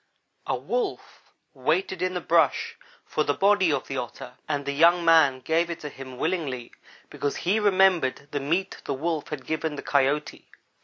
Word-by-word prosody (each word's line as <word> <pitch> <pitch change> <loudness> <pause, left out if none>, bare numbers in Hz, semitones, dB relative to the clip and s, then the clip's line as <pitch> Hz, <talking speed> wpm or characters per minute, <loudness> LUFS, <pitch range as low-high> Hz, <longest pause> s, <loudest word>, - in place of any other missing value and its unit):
"A - - +1
Wolf 450 -6 -4 0.2
waited 190 - -1
in 185 0 -1
the 180 - -2
brush 165 -6 +2 0.3
for 155 - 0
the 145 -1 0
body 195 -3 +3
of 140 -2 -1
the 135 - -5
Otter, 125 +1 -6 0.2
and 145 -2 -1
the 140 - -1
young 170 +4 +4
man 160 -6 +5
gave 165 +5 +1
it 170 - -5
to 150 - -5
him 130 -2 -10
willingly, 145 -7 -2 0.4
because 145 - -2
he 200 +5 +3
remembered 185 -9 +2
the 145 - -1
meat 170 +7 -2
the 140 - -2
Wolf 160 +2 -2
had 145 -4 -6
given 160 -1 -2
the - - -7
Coyote. 140 +1 0
155 Hz, 175 wpm, -25 LUFS, 140-175 Hz, 0.4 s, man